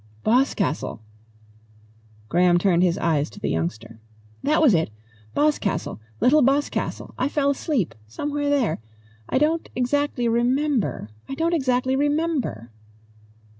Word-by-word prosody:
"Boscastle!" 220 - +1 1.3
Graham 175 +5 +4
turned 175 -1 +3
his 175 -2 +2
eyes 155 -5 +1
to - - -13
the - - -2
youngster. 110 +8 -3 0.4
"That 305 +3 +2
was 295 -9 +5
it 160 -6 +2 0.5
Boscastle. 290 - 0 0.2
Little 300 +4 +5
Boscastle. 275 +3 0
I 260 - +1
fell 280 -1 +1
asleep 275 - -1
somewhere 290 - -2
there. 260 - +1 0.5
I - - +1
don't 315 +4 +1
exactly 255 0 0
remember. 240 - 0 0.2
I 270 - -3
don't 330 +3 0
exactly 260 -3 +1
remember." 290 - -1
255 Hz, 120 wpm, -23 LUFS, 175-290 Hz, 1.3 s, was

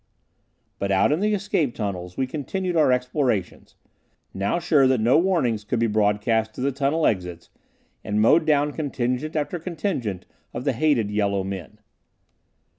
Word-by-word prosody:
But 100 0 -1
out 95 +7 +3
in 150 - +1
the 210 +1 +1
escape 180 -10 -1
tunnels, 90 -4 -5
we 130 - +1
continued 170 +7 -3
our 155 -5 +4
explorations, 125 - -1 0.6
now 100 - -1
sure 155 -6 +3
that 130 -2 +2
no 120 +7 +4
warnings 160 - +1
could 120 - -2
be 115 - +2
broadcast 110 +1 +1
to - - -6
the 140 +2 +1
tunnel 140 +4 0
exits, 90 -4 -2 0.5
and 105 0 -1
mowed 155 +9 +4
down 145 -1 +3
contingent 140 0 -3
after 155 +3 -2
contingent 155 - -3 0.3
of 120 - -4
the 140 - +1
hated 120 -6 +1
yellow 100 -2 0
men. 95 -4 -7
125 Hz, 155 wpm, -23 LUFS, 105-155 Hz, 0.6 s, our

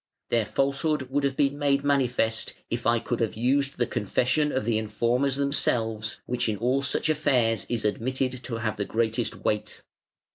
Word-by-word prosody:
Their 115 -2 +2
falsehood 140 +1 0
would 145 +1 +1
have 135 -1 0
been 140 0 +1
made 140 -1 +2
manifest, 125 -5 +1 0.2
if 115 0 -1
I 120 0 +4
could 115 +1 -3
have 115 -2 -1
used 135 +4 +1
the 120 - +2
confession 130 +9 0
of 130 - -1
the 110 -1 +1
informers 120 +5 0
themselves, 115 -6 0
which 125 -1 -1
in 105 - -1
all 125 +5 +1
such 140 +3 +1
affairs 130 -8 +2
is 115 -3 -1
admitted 130 +3 -1
to 115 - -4
have 110 -1 -2
the 100 - -1
greatest 115 +1 -1
weight. 105 0 -1
125 Hz, 175 wpm, -26 LUFS, 115-140 Hz, 0.2 s, I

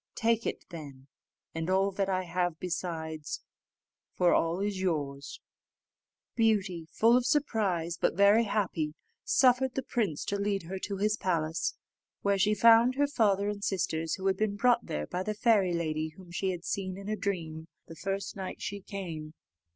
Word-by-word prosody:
Take 230 0 +1
it - - -4
then, 145 -6 -9 0.5
and 165 +1 -3
all 195 +1 +3
that 195 0 -1
I 185 -1 0
have 175 -1 -1
besides, 160 -3 -4 0.7
for 175 -1 +4
all 165 +2 +1
is 200 -1 -2
yours." 145 -6 -2 1.0
Beauty, 195 -8 +1
full 230 +2 +4
of 250 - +3
surprise, 200 - 0
but - - +2
very 200 +4 +5
happy, 170 -7 -1 0.3
suffered 255 0 +3
the 265 - -1
prince 200 -14 -1
to 200 - -1
lead 200 -2 0
her 190 +3 -5
to 200 +1 -4
his 210 +2 +1
palace, 165 -3 -1 0.5
where 200 -1 +2
she 210 +2 +3
found 230 +4 +6
her 285 +1 +3
father 205 -7 +2
and 205 -1 -3
sisters, 165 -5 -1
who 190 - -7
had 190 -1 +2
been 215 -1 0
brought 240 +3 +3
there 75 0 -2
by 180 - -3
the 215 +3 -2
fairy 205 -4 +3
lady 155 -1 -1
whom 185 -2 -13
she 190 +2 -1
had 180 -1 -4
seen 190 -2 -3
in 200 0 -8
a 215 - 0
dream 165 -5 -3 0.2
the 165 - -11
first 195 +3 -3
night 190 -2 -6
she 200 0 -5
came. 165 -6 -6
190 Hz, 175 wpm, -30 LUFS, 165-210 Hz, 1.0 s, found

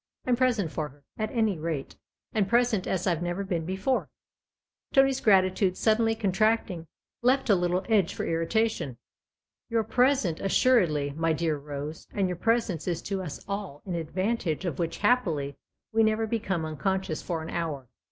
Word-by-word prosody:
I'm 250 - +3
present 240 -9 +1
for 155 -2 -3
her, 145 +1 -21 0.2
at 215 0 -1
any 220 -7 +1
rate, 155 -4 -3 0.4
and 205 -3 +1
present 235 -5 +2
as 185 -1 -1
I've 175 -3 +1
never 175 +3 -2
been 170 -4 -2
before." 190 +8 0 0.8
Tony's 270 -1 +4
gratitude, 185 -2 +3
suddenly 225 0 +3
contracting, 210 -4 +1 0.3
left 255 -1 +3
a - - +6
little 180 +1 0
edge 210 -6 +2
for - - -3
irritation. 165 - 0 0.4
" - - -64
You're 230 -1 +1
present, 245 - +2
assuredly, 180 - +3
my 165 +2 0
dear 160 -1 0
Rose, 145 +2 -6
and 195 -2 +2
your 180 -1 -3
presence 225 -6 0
is 170 -2 -1
to 195 -1 -2
us 165 -6 -7
all 200 -7 -5
an 185 - -4
advantage 180 +1 -1
of 165 -6 -3
which, 165 -1 -1
happily, 170 - +1 0.4
we 225 - +4
never 220 0 +2
become 205 -6 -1
uncon 190 +5 -1
scious 155 -4 -4
for 165 -3 -3
an 160 - -6
hour. 155 -6 -3
190 Hz, 170 wpm, -28 LUFS, 165-220 Hz, 0.8 s, a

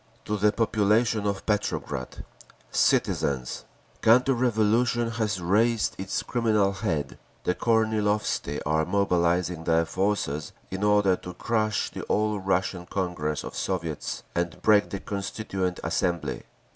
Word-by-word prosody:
To 105 - -1
the 105 +1 +3
Population 110 0 +2
of 100 -1 -2
Petrograd. 105 -1 -2 0.5
Citizens! 65 -3 +1 0.4
Counter 125 +4 +5
revolution 120 0 +2
has 110 -3 -1
raised 105 +6 +2
its 95 0 -2
criminal 110 -5 +2
head. 75 -8 -3 0.2
The 90 - +1
Kornilovtsi 105 -8 0
are 80 +1 +2
mobilising 90 -2 +1
their 85 0 +3
forces 90 -5 -1 0.2
in 95 +1 -3
order 105 -2 +4
to 90 -1 -9
crush 110 0 0
the - - -6
All 105 -1 +1
Russian 95 -1 -1
Congress 90 -6 -2
of - - -7
Soviets 85 -5 -3
and 85 -2 -2
break 105 -1 +5
the 100 - -4
Constituent 95 -2 -3
Assembly. 85 -6 -1
100 Hz, 120 wpm, -26 LUFS, 90-110 Hz, 0.5 s, Counter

